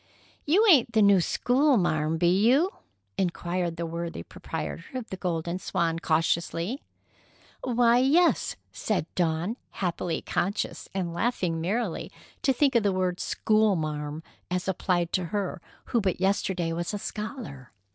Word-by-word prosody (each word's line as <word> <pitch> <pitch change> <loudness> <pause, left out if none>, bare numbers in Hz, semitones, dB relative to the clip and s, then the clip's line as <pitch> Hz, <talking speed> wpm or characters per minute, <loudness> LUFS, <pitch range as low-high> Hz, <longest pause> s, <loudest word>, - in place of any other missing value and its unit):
"You 385 +9 +5
ain't 265 - +6
the 220 - +4
new 200 -2 +6
schoolmarm, 180 - +2
be 175 - +2 0.2
you?" 300 +10 +4 0.5
inquired 175 -1 -1
the 170 - -2
worthy 170 - -5
proprietor 165 - -6
of 250 -3 -4
the - - -2
Golden 175 -1 -2
Swan 165 -2 -1
cautiously. 170 - 0 0.8
"Why, 240 -1 +4
yes," 315 +7 +3 0.2
said 210 -7 -1
Dawn, 175 +6 0
happily 175 -2 -2
conscious, 195 +3 -2
and 175 -3 -2
laughing 175 -5 -1
merrily 200 +2 -2 0.3
to 270 - +3
think 275 +1 +2
of 235 - +4
the 205 -1 +2
word 185 -1 -1
"schoolmarm" 160 -8 0 0.3
as 180 +1 -2
applied 175 -2 0
to 185 - +1
her 190 -1 -3 0.2
who 235 - +1
but 190 -3 -1
yesterday 190 -3 0
was 170 +4 -3
a - - -1
scholar. 210 - -6
185 Hz, 135 wpm, -27 LUFS, 170-230 Hz, 0.8 s, ain't